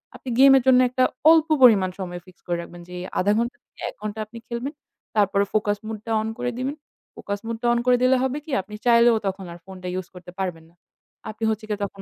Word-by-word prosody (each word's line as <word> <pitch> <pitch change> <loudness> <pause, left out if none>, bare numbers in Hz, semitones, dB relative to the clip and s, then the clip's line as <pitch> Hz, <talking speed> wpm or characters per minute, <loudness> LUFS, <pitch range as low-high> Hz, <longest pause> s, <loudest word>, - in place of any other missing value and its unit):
আপনি 260 - -8
game 270 0 +8
এর 260 - +1
জন্য 255 -1 +7
একটা 255 +1 +1 0.3
অল্প 325 0 +4
পরিমাণ 210 -7 +6
সময় 180 -2 -5
fix 185 - -16
করে 175 -1 0
রাখবেন 175 0 -11
যে, 180 - -11
এই 180 - -6
১/২ 200 +3 +2
ঘণ্টা 235 +2 -1
থেকে - - -20
১ - - -12
ঘণ্টা 215 +1 -5
আপনি 225 +3 -12
খেলবেন। 245 +5 -4 0.4
তারপরে 200 -1 +3
focus 205 -1 +1
mode 220 -1 -5
টা 230 - -4
on 220 - -3
করে 245 0 -1
দিবেন। 265 +3 -3 0.4
Focus 200 0 -5
mode 230 -1 -4
টা - - +2
on 240 - +1
করে 250 -1 +5
দিলে 255 +1 +5
হবে 265 +2 -1
কি? 315 - -8
আপনি 210 +2 -11
চাইলেও 235 -1 +6
তখন 190 0 -4
আর - - -10
phone 190 -1 -10
টা - - -4
use 185 - -9
করতে 180 0 -11
পারবেন 180 -4 -3
না। 170 - -28 0.5
আপনি 220 +1 -8
হচ্ছে 215 0 -2
গিয়ে 210 -1 -2
তখন 195 0 -10
215 Hz, 245 wpm, -23 LUFS, 190-245 Hz, 0.5 s, game